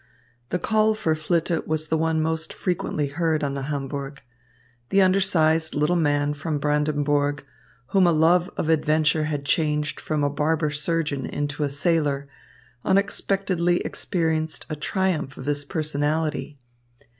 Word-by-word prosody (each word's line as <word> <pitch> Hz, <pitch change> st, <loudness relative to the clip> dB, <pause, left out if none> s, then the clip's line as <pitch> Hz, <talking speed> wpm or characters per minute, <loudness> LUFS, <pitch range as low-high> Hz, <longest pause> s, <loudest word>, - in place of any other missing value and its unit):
The 180 Hz, -, 0 dB
call 215 Hz, +3 st, +2 dB
for 165 Hz, -7 st, 0 dB
Flitte 165 Hz, +2 st, -1 dB
was 155 Hz, 0 st, -2 dB
the 160 Hz, -, +2 dB
one 160 Hz, -1 st, +1 dB
most 160 Hz, 0 st, -2 dB
frequently 175 Hz, -5 st, -1 dB
heard 160 Hz, +1 st, 0 dB
on 140 Hz, -1 st, -1 dB
the 140 Hz, -, -3 dB
Hamburg. 140 Hz, -1 st, -4 dB, 0.7 s
The 195 Hz, -, +3 dB
undersized 165 Hz, -4 st, +2 dB
little 150 Hz, +4 st, +2 dB
man 145 Hz, -3 st, +1 dB
from 155 Hz, +1 st, -3 dB
Brandenburg, 145 Hz, -1 st, 0 dB, 0.4 s
whom 190 Hz, -2 st, +4 dB
a -, -, +5 dB
love 170 Hz, +3 st, +3 dB
of -, -, -1 dB
adventure 155 Hz, -1 st, +2 dB
had 145 Hz, -2 st, -3 dB
changed 150 Hz, 0 st, 0 dB
from 155 Hz, -2 st, -1 dB
a 145 Hz, -, +2 dB
barber 150 Hz, +1 st, 0 dB
surgeon 150 Hz, -3 st, -1 dB
into 145 Hz, +1 st, -3 dB
a 145 Hz, -, +1 dB
sailor, 145 Hz, -1 st, 0 dB, 0.6 s
unexpectedly 190 Hz, -2 st, +1 dB
experienced 160 Hz, -3 st, -2 dB
a -, -, -1 dB
triumph 155 Hz, -2 st, -1 dB
of 130 Hz, -, -8 dB
his 145 Hz, 0 st, -1 dB
personality. 150 Hz, 0 st, -2 dB
155 Hz, 140 wpm, -24 LUFS, 145-165 Hz, 0.7 s, a